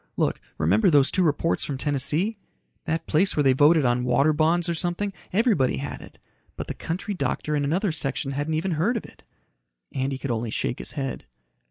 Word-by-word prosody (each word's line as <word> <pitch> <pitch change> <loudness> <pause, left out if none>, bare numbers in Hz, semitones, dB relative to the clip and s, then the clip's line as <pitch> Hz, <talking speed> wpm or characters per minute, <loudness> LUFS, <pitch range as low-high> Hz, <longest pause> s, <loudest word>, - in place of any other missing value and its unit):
Look, - - 0 0.2
remember 95 - +3
those 145 -4 +5
two 185 - +1
reports 165 0 +1
from 140 - -3
Tennessee? 150 - 0 0.5
That 160 -1 -2
place 185 +5 +2
where 150 - +4
they 135 -1 +5
voted 150 +2 +5
on 120 0 +2
water 135 +5 +3
bonds 165 +3 +2
or 170 - 0
something, 175 +4 -2 0.2
everybody 200 - +2
had 140 - -5
it. - - -14 0.4
But - - -4
the - - -5
country 185 +5 -4
doctor 150 -1 -2
in 145 - 0
another 175 +7 +1
section 140 -2 -2
hadn't 145 +3 -2
even 180 +4 -1
heard 180 +10 +1
of - - -6
it." - - -16 0.7
Andy 135 0 -1
could 135 -1 -4
only 115 0 -2
shake 120 - -2
his - - -3
head. 135 -3 -4
150 Hz, 195 wpm, -25 LUFS, 135-175 Hz, 0.7 s, those